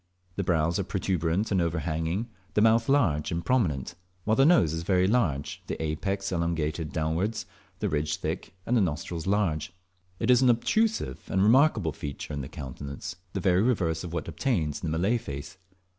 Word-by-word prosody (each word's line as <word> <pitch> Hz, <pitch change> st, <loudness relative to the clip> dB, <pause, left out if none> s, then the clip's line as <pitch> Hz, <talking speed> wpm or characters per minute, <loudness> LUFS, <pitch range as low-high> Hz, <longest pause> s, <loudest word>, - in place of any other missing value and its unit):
The 100 Hz, -, -1 dB
brows 85 Hz, +1 st, +1 dB
are -, -, +1 dB
protuberant 95 Hz, +1 st, -1 dB
and 95 Hz, -2 st, +3 dB
overhanging, 80 Hz, +5 st, -1 dB, 0.3 s
the 105 Hz, -, +4 dB
mouth 115 Hz, +2 st, +4 dB
large 90 Hz, -, +2 dB
and 85 Hz, 0 st, -2 dB
prominent, 85 Hz, -, +1 dB, 0.3 s
while 110 Hz, +3 st, +2 dB
the 135 Hz, +3 st, +5 dB
nose 160 Hz, -, +4 dB
is 80 Hz, -, -2 dB
very 90 Hz, +1 st, +2 dB
large, 90 Hz, -, 0 dB
the -, -, -4 dB
apex 95 Hz, +6 st, -2 dB
elongated 85 Hz, -2 st, -1 dB
downwards, 80 Hz, +8 st, -1 dB, 0.3 s
the -, -, -1 dB
ridge 75 Hz, 0 st, 0 dB
thick, -, -, -4 dB
and 125 Hz, -, +1 dB
the 115 Hz, -, +4 dB
nostrils 85 Hz, 0 st, -2 dB
large. 85 Hz, -6 st, 0 dB, 0.5 s
It -, -, +3 dB
is 125 Hz, 0 st, +5 dB
an 130 Hz, -, +5 dB
obtrusive 165 Hz, -, +1 dB
and 95 Hz, -, +1 dB
remarkable 110 Hz, -, +4 dB
feature 70 Hz, +1 st, -6 dB
in 70 Hz, -, -3 dB
the 65 Hz, -, -6 dB
countenance, 70 Hz, +1 st, -7 dB, 0.2 s
the 100 Hz, -, -1 dB
very 90 Hz, -1 st, +3 dB
reverse 90 Hz, -9 st, +1 dB
of 85 Hz, -, -6 dB
what 85 Hz, -2 st, -3 dB
obtains 90 Hz, -, -1 dB
in 85 Hz, -, -1 dB
the 80 Hz, -, 0 dB
Malay 105 Hz, +8 st, +2 dB
face. 70 Hz, +2 st, -7 dB
85 Hz, 180 wpm, -27 LUFS, 80-105 Hz, 0.5 s, the